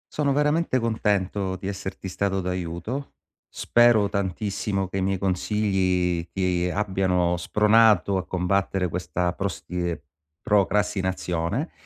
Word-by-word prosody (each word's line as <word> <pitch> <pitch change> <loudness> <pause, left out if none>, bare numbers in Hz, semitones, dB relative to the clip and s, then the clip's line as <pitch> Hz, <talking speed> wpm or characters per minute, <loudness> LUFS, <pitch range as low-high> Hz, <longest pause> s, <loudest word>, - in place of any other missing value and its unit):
Sono 145 -2 +1
veramente 150 +1 +1
contento 100 -5 0
di 95 +1 -7
esserti 95 -1 -5
stato 95 +1 -1
d'aiuto. 90 +8 -4 0.4
Spero 120 -4 +3
tantissimo 100 0 -2
che 95 - -5
i - - 0
miei 95 +1 0
consigli 95 -3 0
ti 90 -1 0
abbiano 95 -3 +1
spronato 105 +1 +4
a 95 - -4
combattere 95 0 0
questa 90 +1 -2
prostie 90 -4 -4 0.4
procrastinazione, 95 - 0
95 Hz, 105 wpm, -24 LUFS, 90-105 Hz, 0.4 s, spronato